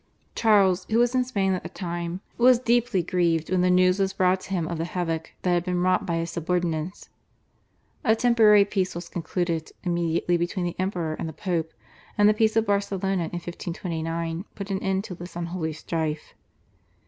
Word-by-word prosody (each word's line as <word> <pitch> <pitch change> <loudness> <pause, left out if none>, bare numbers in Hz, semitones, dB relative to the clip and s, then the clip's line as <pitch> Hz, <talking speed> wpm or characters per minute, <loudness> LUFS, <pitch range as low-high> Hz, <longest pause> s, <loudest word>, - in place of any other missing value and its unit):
Charles, 195 -5 +3
who 220 - +2
was 240 +1 +3
in 255 -1 +3
Spain 200 -6 0
at 185 - -2
the - - -7
time, 175 0 -4 0.2
was 250 +1 +7
deeply 240 -5 +1
grieved 170 -2 0
when 185 -1 +3
the 180 - +3
news 180 +1 +4
was 195 0 +1
brought 185 0 +2
to 185 - -12
him 175 -4 -1
of 170 -1 -4
the - - 0
havoc 165 -2 -3
that 180 - +2
had 175 -1 +2
been 180 -1 -1
wrought 185 0 +2
by 170 - 0
his 165 0 -2
subordinates. 170 0 -2 0.9
A 220 - +4
temporary 220 -4 +5
peace 190 -3 -1
was 170 0 -6
concluded 170 -1 -2
immediately 175 0 +1
between 175 +1 -2
the 175 - -3
Emperor 180 -4 -1
and 165 - -3
the - - -8
Pope, 165 -2 -2 0.5
and 205 -1 +6
the 210 - +6
peace 220 0 +2
of 225 0 +3
Barcelona 195 -3 0
in - - -6
1529 170 0 -4
put 200 0 -6
an 190 - -1
end 190 0 0
to 190 - -7
this 175 0 -10
unholy 170 -1 -3
strife. 155 -1 -3
180 Hz, 190 wpm, -25 LUFS, 170-195 Hz, 0.9 s, was